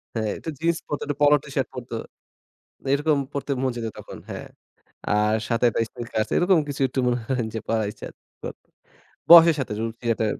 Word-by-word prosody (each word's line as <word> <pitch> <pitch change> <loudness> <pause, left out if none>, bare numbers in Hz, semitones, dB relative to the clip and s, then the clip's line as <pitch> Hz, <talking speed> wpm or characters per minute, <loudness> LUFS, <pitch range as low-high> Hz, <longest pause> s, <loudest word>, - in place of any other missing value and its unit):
হ্যাঁ, 110 -2 -1
একটু 160 - -7
জিন্স 165 0 +1
পরতে, 145 - -3
একটু 145 -1 -2
Polo 145 0 +7
টি-শার্ট - - -2
পরতো। - - -6 1.0
এরকম 150 +1 +2
পরতে 140 0 -4
মন 130 -1 +1
চাইতো 115 -2 -4
তখন, - - -10
হ্যাঁ। - - -6 0.7
আর 105 +1 +2
সাথে 115 +1 +2
একটা 115 - -1
স্নিকারস 120 -3 -7
আছে। - - -6
এরকম 175 -1 +4
কিছু 140 -1 -4
একটু 130 - -3
মনে 120 0 +1
করেন 125 -4 0
যে 110 - -2
পরার 110 -2 0
ইচ্ছা 105 - -9 0.4
করতো। - - -8 0.6
বয়সের 170 -1 +10
সাথে 125 -5 -3
রুচির 115 +1 -4
একটা 110 - -1
125 Hz, 185 wpm, -24 LUFS, 115-145 Hz, 1.0 s, বয়সের